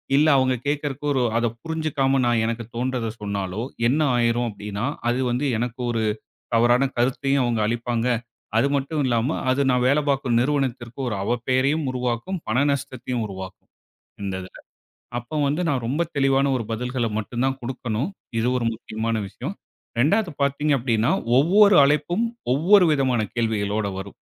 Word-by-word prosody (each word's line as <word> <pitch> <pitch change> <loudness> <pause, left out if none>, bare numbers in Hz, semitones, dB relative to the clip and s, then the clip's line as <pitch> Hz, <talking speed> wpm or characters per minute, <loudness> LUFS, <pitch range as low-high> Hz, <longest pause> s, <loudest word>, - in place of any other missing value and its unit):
இல்ல 150 +2 +5
அவுங்க 130 -1 +2
கேக்கறக்கு 145 -1 -2
ஒரு 130 - +1 0.2
அத 120 0 +2
புரிஞ்சுக்காம 150 -5 0
நான் 120 -2 +2
எனக்குத் 115 0 -4
தோண்றத 125 -2 -1
சொன்னாலோ! 100 0 -3 0.3
என்னா 150 +4 +2
ஆயிரும் 120 0 +1
அப்படின்னா? 105 +2 -5 0.2
அது 125 +2 0
வந்து 125 +4 0
எனக்கு 120 +1 -3
ஒரு, 115 -1 0 0.5
தவறான 120 +3 +4
கருத்தையும் 135 +2 +1
அவுங்க 115 -3 0
அளிப்பாங்க. 120 +1 -1 0.5
அது 140 - +3
மட்டும் 140 +2 -1
இல்லாம, 120 +1 +1 0.2
அது 140 +2 +1
நான் 125 0 +2
வேல 145 +3 +3
பாக்கும் 130 -4 +1
நிறுவனத்திற்கு 130 -3 -1
ஒரு 110 -4 -2
அவப்பெயரையும் 130 +6 +1
உருவாக்கும். 125 +9 -2
பண 130 +5 +2
நஷ்டத்தையும் 130 -3 -3
உருவாக்கும். 95 -1 -9 0.5
இந்த 95 -1 -2
இதுல. 95 - -13 0.7
அப்ப 150 +6 -4
வந்து 150 +5 -1
நான் 130 -4 -1
ரொம்ப 150 +6 +1
தெளிவான 135 0 +3
ஒரு 115 - -4
பதில்கள 125 +1 -2
மட்டும்தான் 130 +5 -2
குடுக்கணும். 125 - -3 0.3
இது 120 - 0
ஒரு 115 - -1
முக்கியமான 110 0 -3
விஷயம். 150 - -6 0.4
2வது 195 - +2
பாத்தீங்க 140 +2 +1
அப்படின்னா, 115 -2 +1 0.3
ஒவ்வொரு 200 +6 +6
அழைப்பும், 150 +10 +1 0.3
ஒவ்வொரு 180 +7 +5
விதமான 130 -4 +1
கேள்விகளோட 110 -2 0
வரும். 95 +1 -8
125 Hz, 145 wpm, -23 LUFS, 115-140 Hz, 0.7 s, ஒவ்வொரு